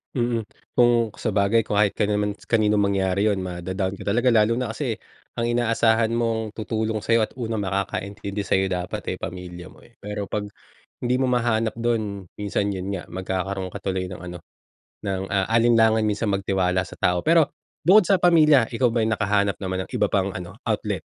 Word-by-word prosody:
Mm 120 -2 0 0.3
kung 120 -2 +4
sabagay 105 +1 +1
kahit 105 -1 +2
ka - - 0
naman 105 0 0
kaninong 105 -2 +3
mangyari 100 0 +1
yun 100 - -1
ma-da-down 95 +2 -3
ka - - -9
talaga 120 +5 +2
lalo 110 0 +4
na 125 -3 -2
kasi 120 -7 -3 0.4
ang 115 - 0
inaasahan 115 -1 +2
mong 115 -2 -1
tutulong 110 0 -2
sa'yo 115 +1 +2
at - - -3
unang 110 -3 -2
makakaintindi 100 +1 -3
sayo 95 0 +1
dapat 90 0 -3
eh - - -13
pamilya 90 -1 -7
mo - - -18
eh. 120 - -21
Pero 105 0 -4
pag, 105 - -2 0.6
hindi 125 +1 +1
mo 130 - +1
mahanap 120 -3 +1
dun 110 -5 -2
minsan 100 0 -1
yun 95 0 -4
nga 90 - -4
magkakaroon 95 +1 -3
ka - - -4
tuloy 95 -1 -2
ng 90 - -8
ano, 90 -1 -7 0.7
ng, 95 -1 -2
ah, 95 -1 +2
alinlangan 115 -1 +4
minsan 105 +1 0
magtiwala 95 -2 +1
sa - - -11
tao 90 -1 +1
pero, 165 -2 +5 0.4
bukod 190 +3 +7
sa 195 +2 +4
pamilya 155 -7 +6
ikaw 125 +1 +2
ba 115 - +1
ay - - 0
nakahanap 100 -2 +1
naman 95 -1 -2
ng - - -21
iba - - +3
pang 95 0 +2
ano 90 -1 -8
outlet? - - -1
105 Hz, 180 wpm, -24 LUFS, 95-115 Hz, 0.7 s, bukod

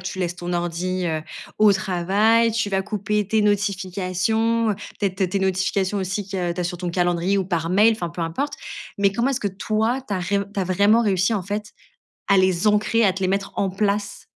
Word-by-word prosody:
tu 190 0 -6
laisses 175 -1 -2
ton 175 0 -5
ordi, 175 +1 -2
heu, 160 -2 -2 0.4
au 215 -1 +6
travail, 205 +4 +2
tu 220 -2 -1
vas 195 -1 +1
couper 210 0 -1
tes 215 +2 +2
notifications, 205 +3 0
heu, - - 0 0.3
peut-être 195 -2 -1
tes 185 +2 -1
notifications 190 +1 0
aussi 190 +2 -2
qu'il 195 0 -5
y - - -2
a 175 -1 -1
tu 180 - -4
as - - -1
sur 175 0 -4
ton 175 0 -3
calendrier 175 +2 +1
ou 190 - 0
par 170 -3 -2
mail, 210 +5 +5
enfin, 195 -6 -3
peu 170 +1 -5
importe. 165 - -2 0.4
Mais 200 -1 +3
comment 235 +6 +1
est-ce 270 -1 -2
que 205 - 0
toi, 215 +5 -1
tu 205 - -2
as - - -1
ré 200 +3 0 0.2
tu 200 - -1
as - - 0
vraiment 200 +5 +3
réussi 195 0 +2
en 200 - -1
fait 210 +3 -5 0.6
à 200 - +5
les 185 0 +2
ancrer, 215 +2 +2
à 195 - +4
te 190 - -7
les 185 - +1
mettre 195 +1 -1
en 195 - 0
place? 200 +1 -2
195 Hz, 225 wpm, -22 LUFS, 180-210 Hz, 0.6 s, au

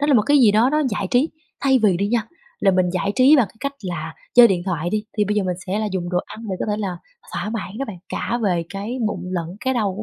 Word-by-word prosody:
đó 290 - +1
là 290 - +4
một 215 - +5
cái 290 +3 +4
gì 235 -6 +6
đó 230 +5 +4
nó 305 0 +2
giải 200 -2 -2
trí. 260 +6 +3 0.3
Thay 265 -2 +4
vì 195 -5 +4
đi 200 +2 0
nha, 235 -1 +1 0.4
là 195 - +4
mình 185 -1 +2
giải 185 +2 -1
trí 265 +4 +6
bằng 245 -6 +4
cái - - -23
cách 280 0 -3
là 165 -4 -5 0.2
chơi 240 -1 +9
điện 180 -3 0
thoại 175 -2 -2
đi, 215 0 -1
thì 210 - +4
bây 210 +1 -1
giờ 205 - +1
mình 180 -1 -1
sẽ 195 +3 -1
là 215 - -1
dùng 175 -1 -3
đồ 180 - +1
ăn 225 - -10
để 185 - -2
có - - -1
thể 210 - 0
là 190 -5 -3 0.3
thỏa 210 - -3
mãn 220 -1 -5
đó 275 - -1
bạn, 210 -7 -7
cả 240 - -2
về 175 -4 +1
cái 210 +6 -5
bụng - - -3
lẫn 175 +1 -4
cái 260 0 0
đầu 205 -5 0
của 215 - -5
210 Hz, 300 wpm, -21 LUFS, 185-240 Hz, 0.4 s, chơi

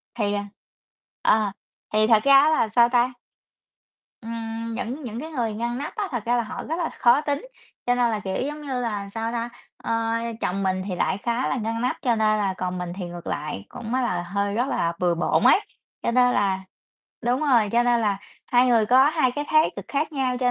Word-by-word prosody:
Thì, 205 -3 0
à 205 0 -2 0.8
ờ, 215 -2 +3 0.4
thì 215 0 +4
thật 220 -2 +5
ra 275 - +5
á 305 - +4
là, 230 -8 +2
sao 235 +2 +5
ta 245 0 +2 1.1
Ừm, 230 0 -5
những 255 +5 -4
những 230 -1 -5
cái 320 +2 -7
người 235 -6 -1
ngăn 235 +3 -3
nắp 285 - -5
á 415 -3 -2
thật 240 -4 -3
ra 240 +1 +2
là 235 - +1
họ 215 - -6
rất 320 - -3
là 330 - -1
khó 245 +5 +3
tính, 295 +11 -2 0.4
cho 245 0 +2
nên 240 -2 +2
là, 215 - -1
kiểu, 190 -1 -4
giống 295 +1 -5
như 265 -4 -3
là, 205 -4 -3
sao 225 +2 -3
ta 235 0 -3 0.3
ơ, 230 0 -1 0.3
chồng 195 +2 -1
mình 185 0 0
thì 185 -3 -3
lại 190 - 0
khá 235 +4 -1
là - - 0
ngăn 230 0 -2
nắp 250 - 0
cho 240 -3 +2
nên 215 -1 +2
là 195 -2 0
còn 180 0 -3
mình 175 -1 -4
thì 185 -2 -5
ngược 175 0 -8
lại 145 -10 -4
cũng 230 0 -6
á 260 - +2
là 180 -7 -1
hơi 200 +3 -2
rất 245 +3 +1
là 170 -10 0
bừa 175 -2 +2
bộn 170 - +1
ấy. - - +6 0.4
Cho - - +1
nên 250 0 +4
là 195 -2 +1 0.6
đúng 245 +3 +1
rồi, 245 -8 +3
cho 240 +1 +4
nên 240 -1 +2
là 205 -3 0 0.3
hai 245 +1 +4
người 230 -3 +4
có 260 +4 +6
hai 305 -6 +2
cái 290 +2 -3
thái 310 0 +4
cực - - -6
khác 300 +3 -1
nhau, 260 -3 0
cho 250 -1 +2
230 Hz, 230 wpm, -24 LUFS, 205-255 Hz, 1.1 s, ấy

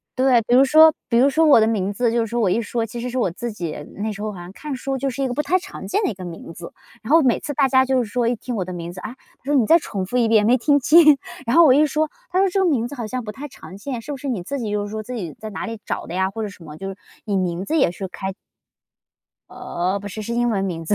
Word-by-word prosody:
对， 255 -2 +4
比 245 - +4
如 270 +2 +7
说 315 +3 +7 0.2
比 235 - +1
如 270 +3 +5
说 320 +4 +3
我 290 -7 +7
的 220 - +4
名 205 -3 -1
字， 235 +2 +1
就 235 0 +1
是 - - -7
说 235 +2 -1
我 195 - +2
一 220 - +1
说， 230 +1 -2
其 235 +3 -7
实 245 - -4
是 250 +1 -2
我 230 - +1
自 235 +8 -5
己 170 -6 -5 0.2
那 215 +2 -2
时 200 - -8
候 215 - -2
好 185 - -10
像 175 +1 -9
看 290 +7 -6
书 270 +1 -3
就 270 +1 -2
是 275 +2 -5
一 270 - +1
个 245 - -3
不 295 - 0
太 370 +1 +2
常 - - -9
见 405 +3 0
的 - - +1
一 - - -3
个 185 - -8
名 170 -1 -8
字。 170 - -9 0.3
然 225 - -5
后 325 - +7
每 250 -4 +2
次 290 - -5
大 275 -1 +3
家 260 0 +4
就 260 -2 +1
是 210 - -8
说 245 0 0
一 240 - +1
听 240 +2 -6
我 185 -4 -2
的 185 - -6
名 170 -1 -6
字， 185 - -9
啊， 220 - -6
他 260 - -29
说： 290 - 0
“你 245 -6 +3
再 330 - +7
重 195 - -4
复 245 - -1
一 235 -2 +3
遍， 220 -2 +4
没 250 +2 +5
听 285 +4 +3
清。” 300 0 +6 0.3
然 235 - 0
后 335 -1 +8
我 265 - +6
一 300 +2 +5
说， 305 +1 0 0.2
他 370 - +1
说： 390 0 +3
“这 390 - 0
个 380 - +3
名 245 -7 +1
字 285 - -8
好 240 -4 -5
像 250 +3 -4
不 210 - -6
太 280 +6 -8
常 195 -7 -12
见， 245 +3 -5
是 290 - -7
不 285 - -4
是 280 +2 -7
你 235 -8 -2
自 275 +10 -4
己 215 -3 -3
就 210 0 -1
是 - - -9
说 215 0 -4
自 250 - -7
己 180 -10 -5
在 215 0 -7
哪 195 - -5
里 225 -1 -6
找 - - -4
的 175 - -6
呀？ 190 +1 0
或 225 - -5
者 210 - -3
什 190 -3 -14
么？” 150 -2 -10
就 195 +3 -6
是 195 - -7
说 205 - -39 0.3
你 205 -3 0
名 180 -1 -1
字 315 +10 -1
也 270 - +3
是 190 +2 -6
开 190 +1 -5 1.2
呃， 180 +3 -3
不 205 - -7
是， 215 +2 -6
是 230 - -5
英 240 0 +1
文 200 -4 0
名 165 -4 -4
字， 210 - +1
235 Hz, 360 characters per minute, -21 LUFS, 200-270 Hz, 1.2 s, 后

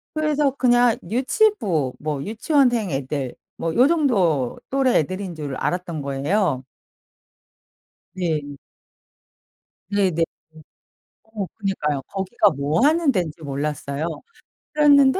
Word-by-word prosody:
그래서 300 -2 +2
그냥 245 -3 +3
유치부, 230 - +1
뭐 145 -2 -3
유치원생 235 - +1
애들 135 -1 -3 0.2
뭐 165 -1 -2
요 250 +4 +6
정도 195 - +1
또래 265 -2 +2
애들인 185 +3 -3
줄 145 -4 -5
알았던 175 -4 -2
거예요. 140 +1 0 1.5
네. 155 -6 -2 1.3
네네. 185 -5 +2 1.0
어 220 -3 -5
그니까요. 150 -9 -1
거기가 190 -3 +1
뭐 145 - 0
하는 315 -1 +4
데인지 170 -6 -2
몰랐어요. 140 +1 -3 0.7
그랬는데 285 +1 +5
185 Hz, 220 characters per minute, -22 LUFS, -, 1.5 s, 요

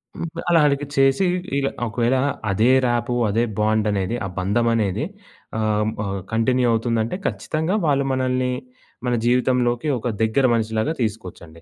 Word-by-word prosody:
హ్మ్. 170 - -4 0.2
అలా 170 -1 +5
అడిగి 140 0 0
చేసి 135 +6 +3 0.3
ఇలా 135 -1 +1 0.2
ఒకవేళ 120 +4 +1 0.4
అదే 110 +5 +3 0.2
రాపో, 120 0 0 0.2
అదే 115 +4 +1 0.2
బాండనేది, 105 -1 +1
ఆ - - -2
బంధమనేది 110 +2 +1 0.6
ఆహ్, 110 - 0
హ్మ్, 110 +1 -1
ఆహ్, 100 0 -3
కంటిన్యూ 125 +2 +2
అవుతుందంటే, 115 +3 0
ఖచ్చితంగా 160 +5 -2
వాళ్ళు 140 -2 +2
మనల్ని, 130 -1 0 0.6
మన 125 - +1
జీవితంలోకి 125 +2 +1
ఒక 125 - -4 0.2
దగ్గర 120 +5 +2
మనిషి 110 -1 -1
లాగా 150 +9 0
తీసుకోవచ్చండి. 90 -7 -5
120 Hz, 140 wpm, -22 LUFS, 110-130 Hz, 0.6 s, అలా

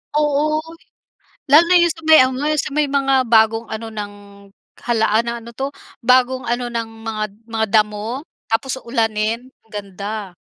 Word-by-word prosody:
Oo, 300 +1 +1 0.9
lalo 305 +4 +8
na 360 - +5
yung 345 -1 +4
sa 325 - -15
may 315 0 +8
ano, 260 +3 -1
yun 305 -1 +1
sa - - -5
may 295 0 +1
mga 270 -2 +2
bagong 225 0 +3
ano 225 +1 -6
ng 205 -1 -5 0.7
halaan 225 -1 +1
na 235 - -2
ano 235 - -9
'to, 270 +4 -3 0.3
bagong 255 +1 +3
ano 240 0 -2
ng 230 -1 -3 0.2
mga 215 -1 -2 0.2
mga 225 -1 -1
damo 215 +5 0 0.2
tapos 260 +3 -1
ulanin, 230 +1 -1 0.2
ganda. 205 -1 -6
235 Hz, 155 wpm, -19 LUFS, 220-275 Hz, 0.9 s, lalo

